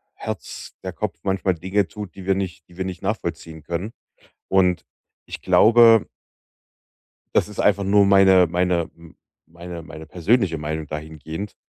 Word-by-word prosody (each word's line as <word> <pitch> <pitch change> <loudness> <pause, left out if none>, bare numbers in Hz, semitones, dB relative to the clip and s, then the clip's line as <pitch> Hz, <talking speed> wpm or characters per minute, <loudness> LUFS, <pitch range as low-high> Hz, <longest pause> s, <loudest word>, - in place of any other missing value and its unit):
Herz - - -7
der - - -4
Kopf - - -4
manchmal 95 -1 0
Dinge 95 +3 0
tut, 105 -3 -9
die 95 - -10
wir 95 0 +2
nicht 95 -2 -5
die 90 - -19
wir 95 - -3
nicht 95 -1 -6
nachvollziehen 80 -2 -4
können. 90 +7 -4 0.5
Und 90 -2 +2 0.4
ich - - -8
glaube 115 -1 +6 1.3
das - - +3
ist 105 - -10
einfach 100 -1 +3
nur 100 +1 +4
meine 95 -2 +6
meine 90 -1 0
m 85 -1 -16 0.3
meine 85 +1 -9
meine 80 -1 -10
persönliche 90 +2 +1
Meinung 75 0 -4
dahingehend. 80 +5 -7
90 Hz, 150 wpm, -22 LUFS, 85-100 Hz, 1.3 s, glaube